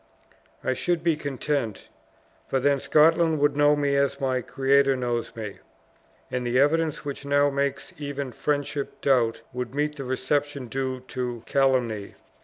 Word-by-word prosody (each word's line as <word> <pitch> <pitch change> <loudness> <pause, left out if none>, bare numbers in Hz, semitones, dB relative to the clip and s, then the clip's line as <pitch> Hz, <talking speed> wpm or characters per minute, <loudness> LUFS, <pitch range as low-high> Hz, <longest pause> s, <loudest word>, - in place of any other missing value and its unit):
I 130 - +1
should 170 +5 -1
be 165 -2 +3
content; 140 -5 -3 0.6
for 135 - +1
then 140 +1 +2
Scotland 160 +2 +4
would 145 0 +2
know 145 0 +5
me 145 -1 +1
as 140 0 +1
my 130 -2 0
Creator 135 +2 +3
knows 120 -2 -2
me; 110 -3 -6 0.7
and 125 0 -1
the 120 +1 +1
evidence 155 +2 +2
which 140 0 -5
now 145 0 +3
makes 140 0 -2
even 140 -2 -4
friendship 145 +1 -2
doubt, 125 -5 +2
would 125 +1 -4
meet 150 +1 -1
the 135 - -4
reception 140 +2 -1
due 130 0 -2
to 125 -2 -5
calumny." 125 -7 +1
140 Hz, 150 wpm, -25 LUFS, 130-145 Hz, 0.7 s, know